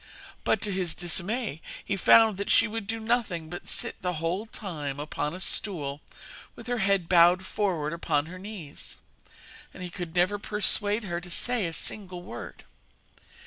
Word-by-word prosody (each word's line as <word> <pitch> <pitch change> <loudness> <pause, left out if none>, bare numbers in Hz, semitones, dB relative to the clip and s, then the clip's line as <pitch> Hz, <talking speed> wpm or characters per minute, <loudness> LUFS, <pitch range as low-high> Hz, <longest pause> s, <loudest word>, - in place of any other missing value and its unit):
But, 205 - +2
to 210 - +2
his 185 -3 0
dismay, 185 - 0 0.2
he 200 - 0
found 220 +2 +6
that 200 - -3
she - - +5
would 215 -1 -5
do 225 +1 -2
nothing 220 -8 -1
but 175 - -7
sit - - -2
the 180 0 -1
whole 170 +7 -2
time 150 -11 -5
upon 150 +1 -3
a - - -7
stool 150 -8 -1 0.5
with - - -11
her 245 -1 -1
head 195 -3 +2
bowed 175 +1 +6
forward 175 -7 -1
upon 150 -3 0
her 180 +3 -9
knees, 190 -7 -9 0.8
and 185 - -7
he 180 - -6
could 175 -2 -6
never 185 +4 +3
persuade 210 +1 +1
her 175 -3 -3
to 175 - -9
say 235 +2 0
a - - -4
single 180 +1 -3
word. - - -8
185 Hz, 170 wpm, -28 LUFS, 170-210 Hz, 0.8 s, found